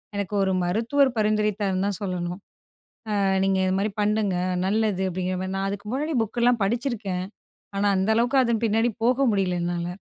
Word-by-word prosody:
எனக்கு 200 0 -3
1 190 - +1
மருத்துவர் 230 +10 +2
பரிந்துரைத்தார்ன்னுதான் 205 -2 0
சொல்லணும். 180 -1 -3 0.8
"அ - - +1 0.2
நீங்க 195 0 +2
இது 185 - +1
மாரி 210 +2 0
பண்ணுங்க, 210 -2 +1 0.3
நல்லது." 210 -1 +1
அப்படீங்கிற 185 +1 -2
மாரி. 190 - -4
நான் 195 0 -1
அதுக்கு 205 +1 -6
முன்னாடி 300 +4 -1
புக்கெல்லாம் 235 +1 +1
படிச்சுருக்கேன். 210 -5 -2 0.5
ஆனா, 200 +1 +1
அந்த 190 +2 0
அளவுக்கு 240 +4 +2
அதன் 235 -2 0
பின்னாடி 225 +2 +2 0.2
போக 255 +3 +3
முடியல, 195 -3 +1
என்னால. 175 0 -2
205 Hz, 155 wpm, -24 LUFS, 190-230 Hz, 0.8 s, போக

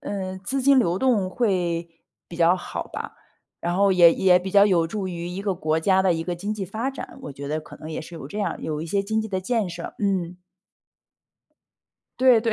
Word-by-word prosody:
嗯， 190 -2 -4
资 270 +6 -1
金 275 0 +6
流 175 -7 +2
动 215 -5 +2
会 180 -7 0 0.4
比 170 - -9
较 170 +1 +5
好 185 - -5
吧。 - - -6 0.4
然 175 +1 -1
后 200 0 +4
也 175 -2 +7
也 180 -1 +5
比 185 +1 -5
较 200 +1 +6
有 175 -5 +3
助 195 +3 -4
于 175 -1 -5
一 185 +3 -5
个 200 -2 0
国 160 -2 0
家 190 +3 +3
的 190 -2 +3
一 165 0 -3
个 175 - -2
经 200 +5 -4
济 205 -2 -4
发 220 +7 -3
展， 270 - -9
我 - - -6
觉 140 +1 -8
得 155 +2 -2
可 - - -13
能 155 - -9
也 155 - -4
是 170 - -10
有 155 -5 -7
这 175 +9 -7
样， 205 - -2
有 155 -1 -3
一 160 - -5
些 200 +4 0
经 220 +2 -1
济 220 - -4
的 190 - -1
建 215 +1 -1
设。 170 0 -7
嗯。 180 -3 -1 1.8
对 255 -3 +6
对， 230 0 0
185 Hz, 245 characters per minute, -24 LUFS, 170-205 Hz, 1.8 s, 也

